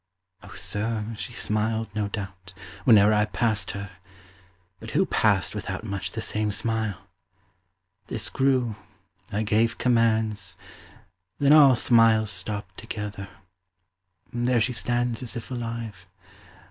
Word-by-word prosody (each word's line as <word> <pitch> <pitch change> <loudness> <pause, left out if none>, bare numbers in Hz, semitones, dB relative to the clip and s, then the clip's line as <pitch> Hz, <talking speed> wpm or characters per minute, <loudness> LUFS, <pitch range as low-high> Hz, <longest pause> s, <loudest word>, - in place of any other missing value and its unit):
Oh - - -12
sir, 110 +1 -1
she 110 - -6
smiled, 110 0 -1
no 105 -1 -1
doubt, 95 -3 -7 0.3
Whene'er 110 -4 +6
I 105 0 +3
passed 110 -1 -1
her; 100 0 -7 0.9
but - - -9
who - - +4
passed - - +2
without - - -5
Much 100 -3 -4
the 110 - -5
same 105 -1 0
smile? 110 -2 -1 1.1
This 110 - -3
grew; 130 -5 +1 0.5
I 105 +1 -1
gave 110 +2 +1
commands; 110 -5 +1 0.8
Then 145 +1 +5
all 140 -4 +8
smiles 115 -3 +4
stopped 105 +2 -5
together. 105 -3 -6 1.0
There 120 0 +1
she 125 +3 +1
stands 120 0 -1
As 125 - -1
if 120 +2 -7
alive. 115 -6 -5
110 Hz, 120 wpm, -25 LUFS, 105-115 Hz, 1.1 s, all